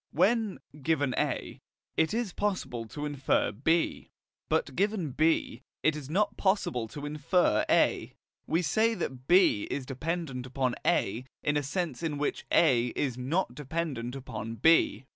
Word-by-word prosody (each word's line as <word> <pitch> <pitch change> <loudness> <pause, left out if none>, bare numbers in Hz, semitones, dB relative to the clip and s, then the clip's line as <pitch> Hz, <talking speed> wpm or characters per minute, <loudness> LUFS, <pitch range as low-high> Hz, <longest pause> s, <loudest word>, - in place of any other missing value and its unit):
When, 210 +4 +2 0.2
given 145 -3 +1
A, - - -2 0.3
it 160 0 +2
is 225 -4 -2
possible 135 - -2
to 145 +6 -5
infer 145 -2 +1
B, 160 +10 0 0.4
but - - 0
given 195 -6 0
B, 155 -4 +1 0.2
it 155 - +3
is 145 -3 -7
not 200 +6 +1
possible 190 - +1
to 145 +6 -7
infer 150 +4 +2
A, - - +2 0.3
we 170 +3 +1
say 220 +9 +2
that 130 - -5
B 180 - +4
is 140 - -3
dependent 135 -1 -3
upon 130 -1 -1
A 115 +6 +1 0.2
in 145 - +1
a 145 - +2
sense 155 0 -3
in 160 -3 -2
which 145 - -2
A 125 -7 +4
is 130 -4 -1
not 130 +4 -1
dependent 135 -3 -3
upon 115 -4 -6
B. 145 -4 +3
150 Hz, 150 wpm, -29 LUFS, 130-175 Hz, 0.4 s, B